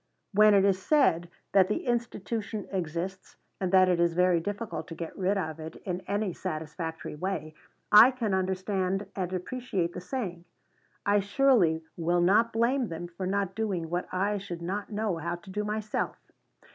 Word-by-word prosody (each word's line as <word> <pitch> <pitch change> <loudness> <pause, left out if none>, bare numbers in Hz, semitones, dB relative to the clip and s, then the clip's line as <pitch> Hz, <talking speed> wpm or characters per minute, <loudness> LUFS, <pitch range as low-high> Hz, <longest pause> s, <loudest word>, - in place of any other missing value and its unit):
When 210 +1 +6
it 195 0 +5
is 190 -1 +2
said 180 - +3 0.2
that 190 -1 +5
the 210 - -2
institution 230 -3 -2
exists, 180 +1 -4 0.2
and 185 -2 -1
that 185 -1 +6
it 180 -2 +2
is 170 -1 +2
very 180 -1 +4
difficult 205 +5 -4
to 165 - -7
get 165 -1 -6
rid 195 +2 +1
of 160 -4 -3
it 160 0 -7
in 180 -1 -2
any 205 -2 -1
satisfactory 160 +1 -5
way, 155 -1 -3 0.4
I 215 +4 +10
can 240 -6 -2
understand 190 +1 0
and 185 -2 -2
appreciate 185 -2 -2
the 180 - -6
saying. 180 -6 -4 0.6
I 205 0 +4
surely 200 -6 +3
will 175 +1 +1
not 210 +6 +4
blame 240 +3 +1
them 170 0 -6
for 185 +2 -5
not 195 -1 0
doing 190 -7 -2
what 175 +1 -1
I 200 +3 0
should 175 -3 -7
not 200 +5 -3
know 210 -4 -1
how 170 +2 -3
to 175 +2 -12
do 210 +2 -2
myself. 215 0 -2
190 Hz, 170 wpm, -28 LUFS, 175-210 Hz, 0.6 s, I